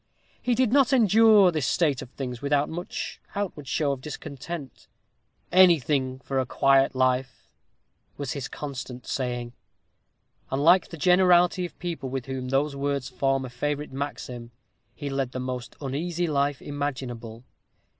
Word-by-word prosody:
He 245 -1 +1
did 255 -2 +2
not 275 -4 +5
endure 220 -4 +6
this 155 -6 -1
state 150 -7 +1
of 130 - -9
things 125 -2 -6
without 145 0 +1
much 175 +3 -5
outward 185 -8 -4
show 145 +2 +1
of 135 -2 -4
discontent. 145 -1 -7 0.6
"Anything 150 -8 +4
for 135 +1 -2
a 130 - 0
quiet 135 0 +3
life," 130 0 0 0.7
was 140 -3 -4
his 140 -1 -4
constant 130 -3 -7
saying; 120 -2 -3 1.0
and, 135 +2 -1
like 180 +4 +6
the 165 - -8
generality 180 +1 +4
of - - -22
people 170 -6 -4
with 130 -1 -4
whom 130 -1 -4
those 140 +2 +1
words 140 -1 -2
form 135 +1 0
a - - -7
favorite 145 +4 -3
maxim, 125 -4 -5 0.5
he 145 - -6
led 135 -2 -2
the 130 - -3
most 125 -1 -5
uneasy 160 +6 -2
life 145 -3 0
imaginable. 125 -5 -5
140 Hz, 145 wpm, -26 LUFS, 130-170 Hz, 1.0 s, endure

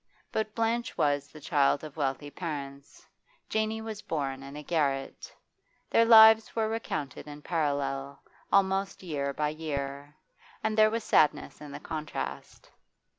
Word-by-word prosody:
But 215 -1 -2
Blanche 230 +1 -1
was, 145 -1 +1
the 155 - -13
child 145 -1 +2
of 155 -2 -9
wealthy 145 -1 -2
parents; 140 -5 -7 0.4
Janey 220 0 -1
was 220 -2 -6
born, 135 -6 -3
in 140 +1 -10
a 150 - -7
garret. 140 -4 -1 0.6
Their 230 - +5
lives 220 -1 +8
were 220 -1 +1
recounted 150 - -4
in 150 0 -10
parallel, 140 -3 -2 0.3
almost 195 0 +1
year 140 -5 -2
by 150 +2 -1
year, 145 -2 -5 0.5
and, 220 0 0
there 215 0 +6
was 225 0 -2
sadness 150 -1 +2
in 150 -1 -9
the - - -7
contrast. 155 -1 -6
150 Hz, 140 wpm, -29 LUFS, 140-215 Hz, 0.6 s, lives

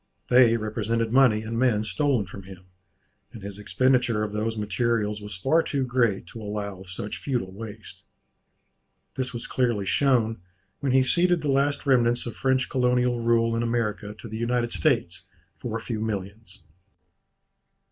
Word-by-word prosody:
They 120 -2 +6
represented 110 +1 -1
money 125 -5 +5
and 115 +1 -3
men 120 -5 +2
stolen 110 +3 0
from 95 +2 -10
him; 95 -1 -13 0.7
and 110 - -11
his 100 0 -7
expenditure 125 0 +2
of 105 -1 -4
those 110 +1 -2
materials 105 0 -1
was 105 -1 -7
far 145 - +3
too 140 -4 -1
great 120 -6 +1
to 115 - -9
allow 105 -2 -5
of 95 - -13
such 100 +3 -5
futile 120 -9 -2
waste. 110 0 -10 1.1
This 130 -1 -3
was 120 -2 -6
clearly 120 -6 0
shown, 115 -2 +2 0.4
when 140 -2 -1
he 130 0 +5
ceded 175 +4 +2
the 145 - +1
last 140 +2 +1
remnants 120 -3 +3
of 120 -3 -6
French 130 0 +1
colonial 125 -1 +1
rule 115 0 +2
in 115 - 0
America 110 -3 -2
to 115 - -9
the 110 0 -6
United 120 +1 0
States 100 - 0 0.3
for 115 -3 -4
a - - -8
few 115 -2 -4
millions. 100 -2 -5
115 Hz, 160 wpm, -25 LUFS, 105-125 Hz, 1.1 s, They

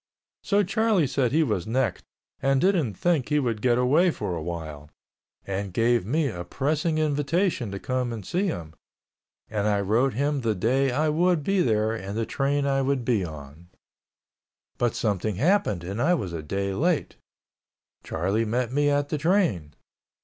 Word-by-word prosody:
So 205 0 +2
Charlie 210 -2 +2
said 130 -2 0
he 160 +3 +3
was 105 - -1
necked 115 -4 -1 0.4
and 135 0 +2
didn't 165 - +1
think 165 - 0
he 150 - +2
would 120 -7 -1
get 120 0 +3
away 145 +9 +4
for 95 - -3
awhile, 80 -3 -6 0.6
and 100 0 -3
gave 115 0 +1
me 150 +5 +1
a 90 -8 -5
pressing 150 - -1
invitation 150 - 0
to 100 - -5
come 125 +3 -2
and 110 -5 -6
see 190 +3 0
him, 80 - -5 0.7
and 105 -1 -1
I 105 -1 +2
wrote 115 +6 +1
him 140 +2 0
the 110 -3 0
day 130 +8 +1
I 150 +5 +1
would 170 0 +2
be 195 +3 +2
there 110 -5 +1
and 100 -1 -5
the 115 - 0
train 140 +2 0
I 135 -1 +1
would 135 -2 0
be 115 -6 +1
on. 75 0 -9 1.1
But 120 -2 +1
something 105 -1 -1
happened 140 - +1
and 100 +6 -4
I 175 +6 +3
was 95 - -4
a 80 - -4
day 95 +5 -2
late. 165 - 0 0.9
Charlie 95 +7 -1
met 120 +2 -1
me 145 +1 +2
at 145 0 +1
the 150 - -2
train. 160 - +1
125 Hz, 170 wpm, -25 LUFS, 100-150 Hz, 1.1 s, away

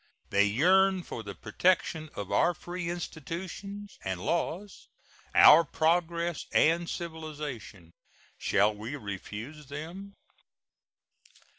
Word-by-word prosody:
They 100 +1 +4
yearn 185 - +3
for 115 - -6
the 100 -3 -8
protection 165 -3 0
of 100 - -5
our 175 - +3
free 175 +1 -5
institutions 180 +5 -6
and 95 -2 -3
laws, 175 - -3 0.5
our 160 +3 +9
progress 170 +1 0
and 170 +2 +3
civilization. 150 - -7 0.5
Shall 105 +2 +3
we 110 +7 -6
refuse 115 +6 -7
them? 170 +8 -8
160 Hz, 100 wpm, -29 LUFS, 115-175 Hz, 0.5 s, our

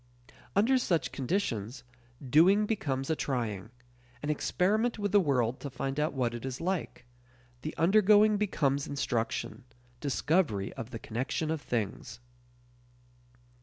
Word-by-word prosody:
Under 250 +6 +4
such 165 - 0
conditions, 130 - -2 0.4
doing 185 +10 +5
becomes 140 -11 -2
a - - +2
trying; 110 -9 -3 0.5
an 150 - 0
experiment 215 +10 +1
with 205 -2 -2
the 205 - +6
world 130 - +1
to 140 - -6
find 135 +2 -3
out 150 +1 0
what 120 -3 0
it 120 - -6
is 130 0 -4
like; 175 -8 -3 0.6
the 155 - -6
undergoing 210 +4 +5
becomes 145 -9 0
instruction 130 -2 -2 0.4
discovery 145 - 0
of 115 - -7
the 120 - -6
connection 130 +8 -3
of 160 -2 -2
things. 110 -1 -3
145 Hz, 130 wpm, -30 LUFS, 125-190 Hz, 0.6 s, the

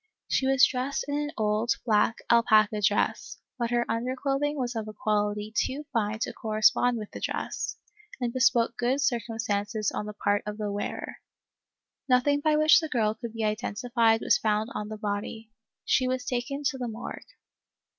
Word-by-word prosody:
She 265 - +1
was 270 -1 +6
dressed 260 +2 -2
in 285 - -3
an 295 0 -2
old, 215 +1 +1
black 220 0 +3
alpaca 215 -2 +4
dress, 205 +1 0 0.2
but 235 -1 0
her 240 0 +1
underclothing 270 +5 -1
was 245 -2 -2
of 220 -1 -3
a 215 - -7
quality 210 0 -1
too 285 +5 -1
fine 215 -2 0
to - - -2
correspond 220 +3 +2
with 210 -2 -7
the - - -7
dress, - - -3 0.4
and 240 -2 -2
bespoke 230 -2 +3
good 250 +3 +1
circumstances 225 -5 -1
on 210 - -4
the 210 - -6
part 205 0 0
of 210 0 -4
the 210 -1 -3
wearer. 205 0 -4 0.9
Nothing 260 +3 +3
by 305 +1 +2
which 310 +1 +6
the 320 -2 -4
girl 215 -5 +1
could 230 0 -8
be 225 -1 -3
identified 225 +1 +1
was - - +3
found 215 +2 0
on 210 0 -4
the 215 - -6
body. 210 +2 -4 0.3
She 255 - +2
was 255 0 -2
taken 255 +3 -3
to 265 -1 -1
the 245 - -2
morgue." 225 +1 -6
230 Hz, 175 wpm, -27 LUFS, 215-255 Hz, 0.9 s, was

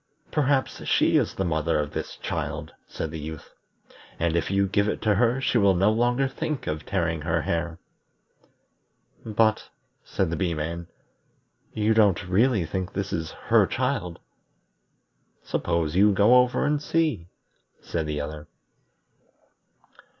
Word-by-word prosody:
"Perhaps 140 -2 0
she - - +3
is - - +1
the 95 - -1
mother 80 -1 0
of 75 -1 -2
this - - -5
child," - - -4
said 80 - -5
the 80 - -6
Youth, 80 +1 -8 0.6
"and 85 0 0
if 85 - 0
you 100 0 +2
give 100 +2 +1
it - - -2
to 110 -2 +3
her 120 +5 +2
she 130 -2 +1
will 100 -2 +4
no 100 +4 +3
longer 120 +4 +1
think 145 +2 -4
of 75 0 -4
tearing 85 -4 -1
her 80 0 0
hair." 85 0 -2 1.5
"But," 110 0 +1 0.3
said 95 -4 -1
the - - -1
Bee 85 0 -1
man, 85 +2 -4 0.9
"you 110 +1 +2
don't 100 -5 +3
really 100 0 +2
think 95 +2 -4
this 100 +1 -3
is 80 -1 -2 0.2
her - - +5
child?" 85 -1 -2 1.3
"Suppose 85 -2 -1
you 105 +3 +5
go 105 +6 +5
over 125 0 +2
and 145 0 +1
see," 150 - 0 0.5
said 80 -2 -3
the 75 -1 -2
other. 75 +1 -7
95 Hz, 145 wpm, -25 LUFS, 80-110 Hz, 1.5 s, her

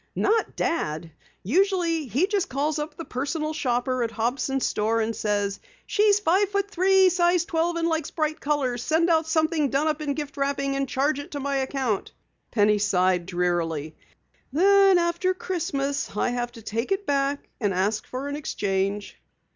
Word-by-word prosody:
"Not 435 +2 +1
Dad. 160 - -2 0.3
Usually 335 - +1
he 270 - +2
just 400 -2 -1
calls 295 +3 -1
up 300 +1 -5
the 330 - -6
Personal 305 +4 -3
Shopper 255 -3 0
at 230 - 0
Hobson's 245 +4 -1
store 220 +2 0
and 225 0 -1
says: 205 -1 -1 0.3
'She's 415 -1 +3
five 385 +2 +2
feet 400 0 -1
three, 380 0 +4
size 350 -1 +2
twelve 335 +1 0
and 335 0 0
likes 320 -3 -1
bright 310 -1 -2
colors. 270 -5 -1
Send 330 +5 +2
out 320 -1 +2
something 315 -2 +1
done 275 +3 +1
up 305 0 -1
in 285 -2 -2
gift 295 -2 -6
wrapping 275 0 -1
and 275 -1 -1
charge 285 +2 -1
to 285 - -5
my 280 0 -1
account.'" 265 -6 -2 0.4
Penny 210 -2 +3
sighed 185 -3 +2
drearily. 170 -4 -1 0.6
"Then 390 +4 +5
after 345 +2 +1
Christmas 285 - -2
I - - +1
have 240 0 -2
to 230 -2 -12
take 230 - -3
it 390 +1 0
back 280 -1 0
and 205 -4 +1
ask 200 +4 -1
for 260 +2 -5
an 285 - -3
exchange." 200 -7 -2
280 Hz, 170 wpm, -25 LUFS, 230-335 Hz, 0.6 s, Then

